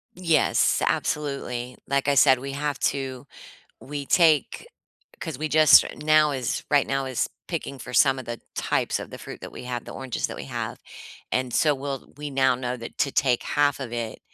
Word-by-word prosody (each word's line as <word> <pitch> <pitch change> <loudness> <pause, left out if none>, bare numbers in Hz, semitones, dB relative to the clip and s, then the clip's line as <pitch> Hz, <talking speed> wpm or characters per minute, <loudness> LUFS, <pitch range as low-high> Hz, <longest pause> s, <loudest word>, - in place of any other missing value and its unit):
Yes. 170 -4 +2
Absolutely. 125 -4 -2
Like 140 0 0
I 140 - +4
said, 135 -2 +6
we 135 +2 -6
have 145 +1 -2
to 135 -1 -2 0.5
we 145 0 -6
take 160 -5 +3 0.5
'cause - - -5
we 155 +1 -2
just 155 0 +7
now 155 0 +4
is 130 -3 -2
right 145 -2 +4
now 135 0 -1
is 130 -2 -1 0.2
picking 155 -5 -4
for 125 - -9
some 135 +3 +4
of 130 - -6
the 120 0 -5
types - - 0
of - - -8
the - - -9
fruit - - -9
that - - -9
we - - -9
have 125 -1 -4
the - - -9
oranges 130 -2 -3
that - - -8
we - - -6
have, - - -5 0.5
and 125 -1 0
so, 150 +3 +3
we'll, 135 -1 -6
we 150 0 -6
now 130 -1 +3
know 125 0 -3
that 115 -1 -9
to 145 -3 +1
take 130 -3 +2
half 145 -1 +1
of 125 -3 -6
it 115 -2 -4
135 Hz, 195 wpm, -25 LUFS, 125-150 Hz, 0.5 s, just